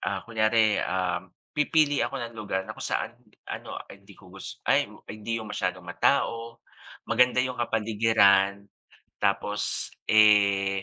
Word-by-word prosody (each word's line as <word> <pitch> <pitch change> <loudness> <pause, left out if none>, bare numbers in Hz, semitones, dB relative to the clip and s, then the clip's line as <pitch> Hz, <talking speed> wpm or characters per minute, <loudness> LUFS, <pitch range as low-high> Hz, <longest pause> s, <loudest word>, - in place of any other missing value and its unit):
Ah, 95 -2 -3
kunyari, 110 -1 +2
ah, 90 -1 -1 0.3
pipili 150 -1 +2
ako 135 - -1
ng 115 - -8
lugar 95 -3 -3
na 110 - -7
kung - - -9
saan - - -2 0.3
ano, - - -7
ah, - - -8
hindi 100 0 -16
ko 90 -2 -17
gus 95 - -10
ay, - - +2 0.2
hindi 110 +2 -4
yung 110 -2 -6
masyadong 90 -2 -3
matao, 115 +4 -1 0.4
maganda 125 +2 +3
yung 125 -1 -4
kapaligiran 105 -3 +3 0.6
tapos, 105 0 -1 0.2
eh, 100 -2 +4
105 Hz, 140 wpm, -26 LUFS, 100-115 Hz, 0.6 s, eh